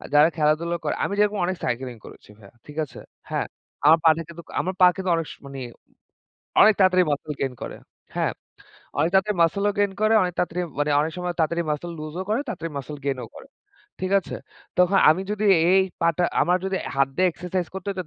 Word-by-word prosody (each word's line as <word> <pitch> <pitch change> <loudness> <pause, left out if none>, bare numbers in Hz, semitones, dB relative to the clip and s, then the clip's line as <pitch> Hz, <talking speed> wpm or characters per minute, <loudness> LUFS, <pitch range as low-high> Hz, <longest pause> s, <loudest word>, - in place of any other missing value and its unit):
যারা 150 +3 +7
খেলাধুলা 155 +3 +1
করে, - - 0
আমি 200 - -1
যেরকম 210 0 +2
অনেক 185 0 -2
সাইকেলিং 125 0 -3
করেছি - - -14
ভাইয়া। 100 0 -17
ঠিক 150 +1 -11
আছে? - - -13 0.3
হ্যা, - - -1 0.4
আমার 160 +2 +8
পা 165 - +7
টা - - -3
কিন্তু 170 0 -10 0.2
আমার 185 +5 -3
পা - - +10
কিন্তু 190 -1 -3
অনেক 165 -2 -2
স - - -15
মানে 135 -1 -8 1.0
অনেক 215 - +7
তাড়াতাড়ি 185 -1 +5
মাসল 145 +1 -3
গেইন 135 -2 -1
করে। - - -6 0.4
হ্যাঁ, - - +1 0.7
অনেক 155 +4 +2
তাড়াতাড়ি 195 +1 +3
মাসলও 200 +5 +1
গেইন 205 -1 +2
করে। 215 +1 +4
অনেক 180 - -2
তাড়াতাড়ি 180 0 -1 0.2
মানে 145 0 +1
অনেক 160 - -2
সময়, 180 0 -3
তাড়াতাড়ি 170 +2 +1
মাসল 170 +4 -4
লুজও 155 +5 -5
করে, 220 - +1
তাড়াতাড়ি 165 -9 -5
মাসল 145 +2 -6
গেইনও 130 -4 -2
করে। - - -12 0.5
ঠিক 185 0 -2
আছে? 190 - -8 0.4
তখন 180 +2 +4
আমি 170 +5 +3
যদি 210 0 -2 0.3
এই 190 0 +6 0.2
পা 170 - +3
টা 180 - +2 0.2
আমার 180 +1 +3
যদি 190 - -1
আ - - -5
হাত 135 0 +4
দিয়ে 185 0 +3
এক্সারসাইজ 180 +1 -3
করতে 190 +1 -7
হযতো, 190 -2 -3
170 Hz, 205 wpm, -24 LUFS, 150-190 Hz, 1.0 s, পা